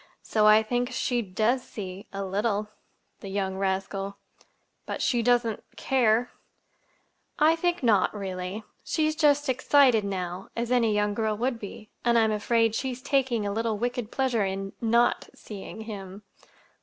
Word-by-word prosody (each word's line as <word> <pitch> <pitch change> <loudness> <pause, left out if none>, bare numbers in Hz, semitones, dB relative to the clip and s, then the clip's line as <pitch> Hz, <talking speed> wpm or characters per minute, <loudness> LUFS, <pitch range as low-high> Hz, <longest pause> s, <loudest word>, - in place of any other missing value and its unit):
so 215 -1 +2
I 215 +1 +7
think 245 +2 -1
she 245 -1 0
does 220 +5 0
see—a 195 -2 -7
little." 205 +2 -1 0.5
"The 195 - -8
young 190 -1 -2
rascal! 195 +1 -2 0.7
But - - -4
she 240 -2 +1
doesn't—care?" 240 0 +1 1.1
"I 315 +2 +5
think 350 -1 -1
not—really. 195 -2 0 0.2
She's 310 -1 0
just 290 -2 +3
excited 255 -3 +4
now, 185 -1 -4
as 235 +1 -2
any 235 -3 +3
young 210 0 +1
girl 215 0 -1
would 240 +1 -1
be; 210 0 -9
and 235 0 +3
I'm 220 -1 +4
afraid 225 +1 +2
she's 255 +1 -3
taking 260 -6 +1
a 200 - -1
little 225 0 -1
wicked 245 0 -2
pleasure 255 -5 +1
in—not 195 +5 0
seeing 210 +1 -9
him." 200 -2 -8
220 Hz, 135 wpm, -27 LUFS, 200-245 Hz, 1.1 s, I